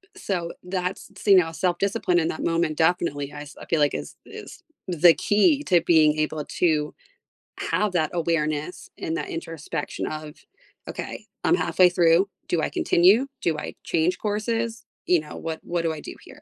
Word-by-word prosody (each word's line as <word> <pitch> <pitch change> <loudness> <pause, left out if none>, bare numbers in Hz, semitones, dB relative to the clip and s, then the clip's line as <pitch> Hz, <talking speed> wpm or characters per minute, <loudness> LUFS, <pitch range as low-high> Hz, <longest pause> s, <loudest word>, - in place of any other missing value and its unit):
So 175 -4 -3
that's 180 0 -4
so, 200 - +1
you 190 - +9
know, 165 -2 +3
self-discipline 180 0 0
in 160 - 0
that - - -4
moment, 165 -2 0
definitely, 160 -4 0
I 145 - -7
s 150 - -11
I - - -9
feel 165 - 0
like 145 - +3
is - - -5
is - - -11 0.2
the 175 -1 +6
key 245 - +3
to 175 - +3
being 155 -2 +4
able 155 -1 -1
to 155 -3 0 0.7
have 210 -3 0
that 160 -3 +1
awareness 160 -1 -2
and 165 +1 -2
that - - -4
introspection 165 -2 -5
of, 155 0 -6 0.5
"Okay, - - -6 0.2
I'm 350 - +4
halfway 185 - +4
through, 175 +2 +3 0.2
do 170 -2 0
I - - -1
continue? 200 +10 +4
Do 160 -2 0
I - - -6
change 165 +2 0
courses? 225 +2 -2 0.2
You 175 -3 +4
know, 150 - -10
what 160 -1 -5
what 175 -1 -2
do 165 - +1
I 155 - -7
do - - -8
here?" - - -15
170 Hz, 180 wpm, -24 LUFS, 155-185 Hz, 0.7 s, you